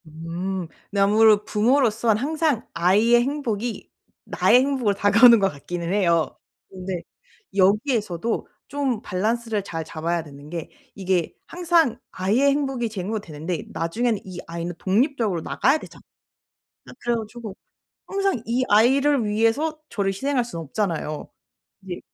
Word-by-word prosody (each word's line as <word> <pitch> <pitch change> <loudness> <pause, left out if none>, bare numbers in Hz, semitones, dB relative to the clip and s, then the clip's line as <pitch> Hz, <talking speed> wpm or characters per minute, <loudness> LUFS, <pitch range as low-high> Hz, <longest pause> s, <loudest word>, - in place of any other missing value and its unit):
음. 170 +3 -4 0.2
근데 200 - -2
아무래도 210 +1 +5
부모로서 230 0 +2
항상 290 +2 0
아이의 210 +8 +4
행복이 240 -5 -3 0.4
나의 250 - +4
행복으로 260 -7 0
다가오는 230 +4 +7
것 195 -1 +2
같기는 170 +5 -5
해요. 170 -5 +2 0.3
근데 185 -2 -5 0.5
여기에서도 210 - +1 0.2
좀 275 -6 -2
밸런스를 220 +2 -1
잘 165 -4 -5
잡아야 165 +2 -3
되는 145 -1 -13
게 165 -1 -5 0.3
이게 185 -4 -1
항상 340 -7 +1
아이의 215 +10 +2
행복이 270 -4 -1
제 205 -3 -5
행복이 215 +4 -2
되는데 160 +2 -5
나중에는 220 +6 -1
이 185 -2 -8
아이는 170 +1 -4
독립적으로 215 - +1
나가야 270 - +2
되잖아. - - -13 0.9
아 - - -10
그래 240 0 0
가지고 220 -2 -7 0.5
항상 390 - -1
이 245 +3 +1
아이를 265 +5 +4
위해서 230 +9 +1
저를 200 -2 0
희생할 265 +5 0
순 170 -8 -7
없잖아요. 160 -2 -3 0.6
이제 180 -2 -6
210 Hz, 315 characters per minute, -23 LUFS, 180-245 Hz, 0.9 s, 다가오는